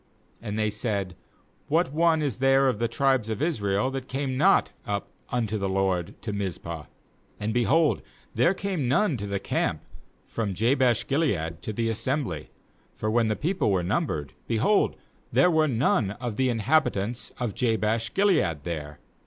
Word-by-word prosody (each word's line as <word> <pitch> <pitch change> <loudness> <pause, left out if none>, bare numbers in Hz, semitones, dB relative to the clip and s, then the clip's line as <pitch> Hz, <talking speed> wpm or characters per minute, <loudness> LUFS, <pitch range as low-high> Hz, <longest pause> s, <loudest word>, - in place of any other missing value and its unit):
8And 105 -2 -4
they 110 -1 +1
said: 100 -4 -2 0.5
'What 160 -1 +1
one 160 0 +3
is 140 -7 -1
there 135 +1 +4
of 125 -5 0
the 115 - +1
tribes 130 -1 +1
of 110 - -2
Israel 120 - 0
that 135 -1 -5
came 135 -1 -2
not - - +4 0.2
up 100 -1 -2 0.2
unto 110 -3 -1
the 100 -1 -1
LORD 95 -3 -1
to 105 - -3
Miz 100 -3 -2
pah?' 85 -2 -7 0.5
And, 105 +1 -2
behold, 145 +7 +3 0.3
there 180 - +3
came 185 -9 -2
none 155 +6 +2
to 100 -1 -5
the 100 0 -2
camp - - -1 0.4
from 105 -4 -3
Jabesh 120 +2 +2
gilead 95 - 0
to - - -4
the 115 +2 -1
assembly. 115 - -2 0.5
9For 110 - 0
when 115 0 +3
the 110 - +1
people 180 - 0
were 95 -3 +1
numbered, 90 - -1
behold, 120 - +2 0.4
there 180 - +4
were 160 -1 +3
none 120 -4 +2
of 120 -3 -3
the 130 +2 +2
inhabitants 115 -2 0
of 120 -5 -2
Jabesh 115 0 0
gilead 160 - +2
there. 75 -3 -5
115 Hz, 165 wpm, -26 LUFS, 100-135 Hz, 0.5 s, there